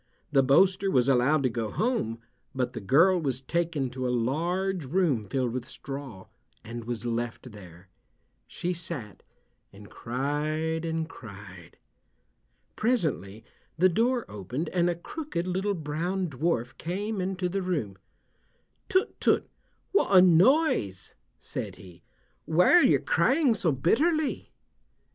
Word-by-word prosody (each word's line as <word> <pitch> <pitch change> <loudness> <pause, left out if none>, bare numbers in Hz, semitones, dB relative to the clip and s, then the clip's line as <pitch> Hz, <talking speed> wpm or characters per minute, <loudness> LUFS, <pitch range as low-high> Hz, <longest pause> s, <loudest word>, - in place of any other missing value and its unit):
The 140 -2 +5
boaster 185 +9 +3
was 125 -8 +3
allowed 135 +3 +3
to 130 - +2
go 115 -2 -3
home, 215 - -1 0.4
but 125 -1 -1
the 115 - -6
girl 165 - +4
was 135 -4 -1
taken 155 -2 -2
to 130 0 -3
a - - -1 0.2
large 180 +5 -1
room 140 - 0
filled 130 -3 0
with 130 -1 -3
straw, 135 -8 -8 0.4
and 115 0 -7
was 120 0 -4
left 120 +1 -3
there. 90 -3 -13 0.6
She 180 +1 -3
sat 165 - -6 0.5
and 100 +1 -14
cried 155 +6 -2
and 160 -1 -2
cried. 100 - -12 1.0
Presently 155 - -1 0.3
the 185 +3 +5
door 235 +6 +1
opened 125 - -5
and 175 -1 +1
a 175 - 0
crooked 175 - -5
little 190 +3 -1
brown 170 +4 -2
dwarf 125 -4 -1
came 200 +4 -3
into 185 0 -2
the 195 +2 -2
room. 150 - -2 0.9
"Tut, 375 0 +1
tut, - - +2 0.4
what 200 - +4
a - - +11
noise," 180 - +3 0.3
said - - -5
he. 90 -1 -15 0.4
"Why 165 +3 +4
are 350 - +8
you - - +5
crying 275 -2 +2
so 180 -6 +1
bitterly." 285 - +1
155 Hz, 135 wpm, -27 LUFS, 120-185 Hz, 1.0 s, a